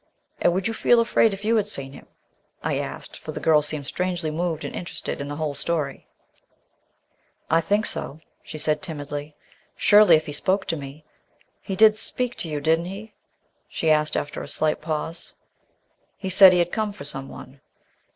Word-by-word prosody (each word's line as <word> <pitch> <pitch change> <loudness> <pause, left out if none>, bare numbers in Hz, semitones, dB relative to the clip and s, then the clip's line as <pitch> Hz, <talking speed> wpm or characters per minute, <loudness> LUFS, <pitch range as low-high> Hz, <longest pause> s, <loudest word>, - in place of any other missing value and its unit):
"And - - +4
would 190 +3 0
you 225 - -2
feel 235 +1 +4
afraid 230 -1 +3
if 200 +1 -7
you 230 +1 +3
had 205 -2 +1
seen 135 -8 -4
him?" - - -13 0.6
I - - 0
asked, - - -7
for - - -7
the - - -5
girl 155 -2 +4
seemed 150 -1 -3
strangely 175 0 -2
moved 165 0 -2
and - - -6
interested 175 -4 -5
in 140 - -5
the 145 - -5
whole 150 -1 -2
story. 150 -2 -3 1.4
"I 165 +1 +4
think 205 +5 +1
so," 145 - 0 0.2
she - - -10
answered 150 0 0
timidly. 145 -3 -6 0.4
"Surely, 205 -5 +6
if 155 0 0
he - - -6
spoke 190 +6 0
to 165 - +1
me. 145 +1 -9 0.6
He 195 - -4
did 215 +2 +6
speak 245 +2 0
to 165 - -2
you, 150 -1 -2
didn't 160 +3 +1
he, 200 +4 -8
sir?" - - -38 0.6
she 160 - 0
asked 150 0 +2
after 145 - -4
a - - -7
slight 155 0 -1
pause. 160 +1 -4 0.8
"He 190 - -5
said 190 0 +9
he 180 - +3
had 175 0 +1
come 215 -2 -2
for 140 - -10
someone." 135 -1 -8
165 Hz, 190 wpm, -24 LUFS, 150-195 Hz, 1.4 s, said